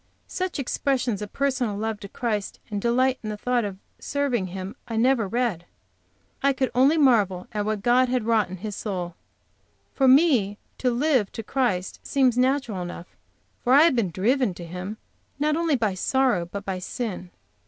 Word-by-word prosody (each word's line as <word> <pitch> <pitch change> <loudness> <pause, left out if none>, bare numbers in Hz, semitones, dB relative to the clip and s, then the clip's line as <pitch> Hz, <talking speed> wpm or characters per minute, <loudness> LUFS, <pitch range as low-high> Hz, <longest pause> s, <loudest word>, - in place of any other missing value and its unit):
Such 370 -2 -3
expressions 255 -5 -1
of 210 - -6
personal 255 -7 -1
love 220 0 -2
to 200 - -9
Christ, 215 -3 -3
and 205 -1 -2
delight 255 +3 +2
in 215 - -5
the 210 - -4
thought 245 +2 0
of 200 -2 -4 0.2
serving 270 -9 -1
Him, 185 +2 -6
I 230 - -4
never 240 -2 +3
read. 225 -6 -1 0.8
I 275 0 +3
could 260 -1 -1
only 270 +6 +4
marvel 210 - +3
at 210 -2 -2
what 215 -2 -2
God 250 +1 +4
had 250 -2 0
wrought 220 -3 +2
in 185 - -6
his 210 -2 -4
soul. 180 -6 -4 0.8
For 270 - +2
me 255 - +4 0.2
to 255 - +2
live 250 -4 +1
to 225 - -5
Christ 215 -8 -1
seems 260 -4 +2
natural 255 -6 +1
enough, 175 0 -8 0.5
for 250 - +3
I 285 +3 +8
have 330 -5 +4
been 225 -6 +1
driven 215 - +1
to 175 - -8
Him 180 +5 -6 0.4
not 300 +1 +1
only 330 -2 +1
by 220 -5 0
sorrow 235 -2 +1
but 200 +3 -7
by 190 -2 -3
sin. 185 -2 -5
235 Hz, 180 wpm, -25 LUFS, 200-260 Hz, 0.8 s, I